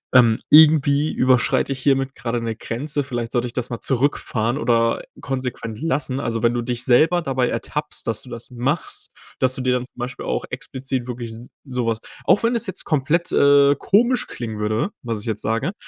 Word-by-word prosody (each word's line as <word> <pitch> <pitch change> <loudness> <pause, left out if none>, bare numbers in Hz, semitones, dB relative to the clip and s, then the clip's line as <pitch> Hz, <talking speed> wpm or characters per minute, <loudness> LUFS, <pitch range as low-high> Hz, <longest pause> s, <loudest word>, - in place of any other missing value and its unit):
ähm, 115 -3 +6
irgendwie 150 -1 +6
überschreite 130 +1 +2
ich 135 - -3
hiermit 135 -1 +1
gerade 120 -2 -3
'ne 115 -1 -3
Grenze. 145 +7 -3
Vielleicht 120 -4 -4
sollte 120 0 0
ich 120 - -9
das 125 -1 -2
mal 120 - -5
zurückfahren 125 -3 0
oder 115 -4 +1 0.2
konsequent 125 -5 -4
lassen.“ 135 -4 0
Also, 115 -4 -2
wenn 120 0 +3
du 120 - -1
dich 120 0 -2
selber 160 +8 +4
dabei 130 -5 0
ertappst, 150 0 -3
dass 115 -2 -1
du 125 - -12
das 120 +2 -5
machst, 130 +6 -3 0.3
dass 130 0 +2
du 130 - -3
dir 125 0 +1
dann 125 0 -1
zum - - -15
Beispiel 125 +1 -5
auch - - -2
explizit 130 -1 -4
wirklich 120 -1 -5
s 115 +2 -9
sowas 120 -4 -2 0.3
auch - - +4
wenn 230 +1 +1
das 230 - -1
jetzt 190 -1 -4
komplett, 155 +3 +1
äh, 140 0 +5
komisch 235 - +2
klingen 110 -3 -6
würde, 110 - 0
was 115 -3 -3
ich 110 - -8
jetzt 110 -2 -2
sage, 115 - -1
125 Hz, 195 wpm, -21 LUFS, 115-145 Hz, 0.3 s, ähm